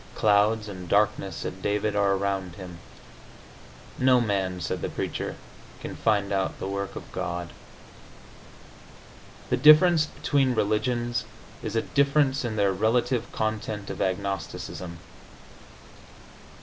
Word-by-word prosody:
"Clouds 105 +1 +3
and 90 -3 -8
darkness," 100 -3 +2
said 95 +3 -6
David, 105 +1 0
"are 100 -1 +3
around 95 -2 -2
him." 90 -3 -9 1.2
"No 130 -1 +5
man," 95 -5 -1
said 85 - -3
the - - -2
Preacher, - - -4 0.4
"can - - -7
find 100 -3 +1
out 95 -1 -1
the - - -4
work 100 0 -4
of - - -9
God."... 85 0 -4 2.0
The 125 - +3
difference 155 +3 +7
between 135 -5 +1
religions 120 +3 0 0.4
is - - -4
a 115 - +2
difference 140 -1 +2
in 115 -3 -2
their 100 -2 +2
relative 115 +4 +1
content 110 -2 -3
of 95 - -6
agnosticism. 95 -2 -3
105 Hz, 120 wpm, -26 LUFS, 95-120 Hz, 2.0 s, difference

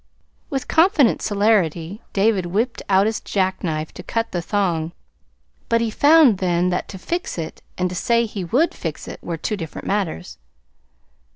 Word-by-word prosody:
With 270 -2 -3
confident 320 - +4
celerity 200 -3 +1
David 195 -3 +2
whipped 225 +7 -1
out 195 0 +4
his 220 +1 0
jackknife 180 -5 -2
to - - -8
cut 230 0 -2
the 175 - -2
thong; 170 -4 -1 0.8
but 230 - +3
he 230 -1 -1
found 285 - +5
then 180 -1 +1
that 180 - -2
to 195 - -7
"fix 345 - -3
it" 160 -2 -6 0.2
and 180 - +1
to 180 - -5
say 235 +5 +2
he 210 -3 -5
would 260 - +1
"fix 160 -4 -6
it" - - -8
were 170 -1 -4
two 215 - -2
different 165 -5 -7
matters. 160 - -2
195 Hz, 165 wpm, -21 LUFS, 175-230 Hz, 0.8 s, found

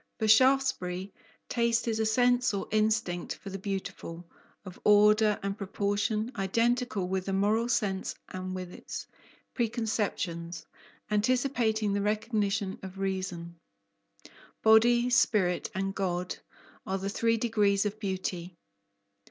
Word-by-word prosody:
For 220 - 0
Shaftesbury, 220 -6 +3 0.3
taste 235 -1 +1
is 225 -1 0
a 220 - +2
sense 245 0 +3
or 195 - -3
instinct 215 -5 0
of 195 - -5
the 195 - -5
beautiful, 185 -3 -5 0.4
of 185 -2 -10
order 210 0 +5
and 200 0 -2
proportion, 205 +3 -1
identical 230 +1 0
with 190 0 -2
the 195 - -2
moral 215 +4 +1
sense 200 -5 -1
and 185 0 -5
with 185 -1 -6
its - - -7 0.5
"preconceptions" 210 -8 -2 0.5
anticipating 220 -1 +1
the 200 - 0
recognition 210 -1 -1
of 190 0 -9
reason. 185 -3 -4 1.0
Body, 235 +3 +5
spirit, 185 -7 +2
and 195 0 -1
God 180 -2 -2 0.5
are 190 - -2
the 195 +1 -4
three 230 +3 +1
degrees 210 -3 +2
of 210 +1 -3
beauty. 185 -3 -4
205 Hz, 120 wpm, -29 LUFS, 190-225 Hz, 1.0 s, order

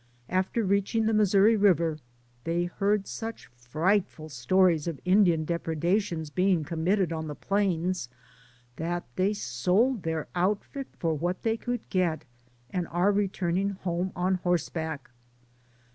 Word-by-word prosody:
After 190 +5 0
reaching 200 +3 +1
the 220 - +2
Missouri 210 +1 +5
River 170 -6 +3 0.4
they 170 +3 0
heard 200 +3 0
such 225 +2 -6
frightful 155 +6 -1
stories 165 +5 +2
of 165 -4 -3
Indian 180 -4 +4
depredations 170 0 -1
being 185 -1 +2
com 160 +1 -4
mitted 190 -2 +2
on 160 -1 -4
the 150 - -5
plains 185 -7 -1 0.7
that 175 +2 -2
they 190 +2 +2
sold 195 - +1
their 160 -2 -3
out 190 +4 +1
fit 275 -2 -7
for 165 -2 0
what 175 +4 -2
they 225 -1 +1
could 245 +1 -4
get, 170 -5 0 0.5
and 180 -3 -2
are 175 +4 +2
returning 195 -2 0
home 185 -1 -3
on 185 +1 0
horseback. 160 -5 -2
180 Hz, 135 wpm, -28 LUFS, 165-200 Hz, 0.7 s, Missouri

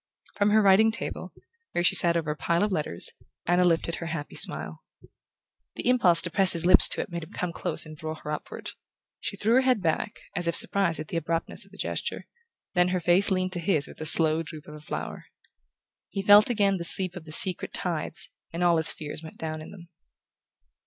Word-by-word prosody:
From 205 0 +1
her 215 +1 +3
writing 200 +3 +4
table, 230 - -6 0.4
where 175 - -1
she - - +4
sat 170 -1 +4
over 155 -2 -3
a - - -4
pile 170 +4 -1
of 210 - -1
letters, 150 - -2 0.3
Anna 175 +1 +2
lifted 170 -1 0
her 165 - -7
happy 155 -3 -6
smile. 75 +1 -1 1.0
The - - -4
impulse 185 -10 +3
to 170 - -4
press 190 +1 +5
his 170 0 0
lips 185 - +6
to - - +1
it - - -8
made 170 -1 -5
him 160 - -14
come 180 -2 -4
close - - 0
and 155 0 -11
draw 155 +1 -6
her 150 - -8
upward. 150 - -7 0.5
She 200 - -6
threw 220 +4 0
her 260 - +4
head 255 -3 +1
back, 160 -2 -2 0.2
as 175 -1 -2
if 170 - -1
surprised 180 -5 +1
at 155 - -7
the 170 - -3
abruptness 165 +1 -4
of - - -24
the - - -16
gesture; - - -4 0.5
then 180 -1 +2
her 180 0 -1
face 175 +3 +2
leaned 185 -1 -1
to 175 - +1
his 165 -4 -1
with - - -14
the 155 - -2
slow 160 0 +5
droop 155 -2 -10
of 150 - -11
a 150 - -11
flower. 150 - -7 0.8
He 195 - -5
felt 205 +3 +6
again 200 -4 +1
the 170 - -6
sweep 185 +1 +5
of 175 -3 -10
the 155 - -11
secret 180 +3 +4
tides, 165 -3 -2 0.2
and 170 +1 -4
all 170 -1 +3
his 160 - +2
fears 150 0 -6
went 160 -1 -12
down 155 -1 -6
in 155 - -11
them. 175 -4 -14
170 Hz, 220 wpm, -26 LUFS, 160-190 Hz, 1.0 s, lips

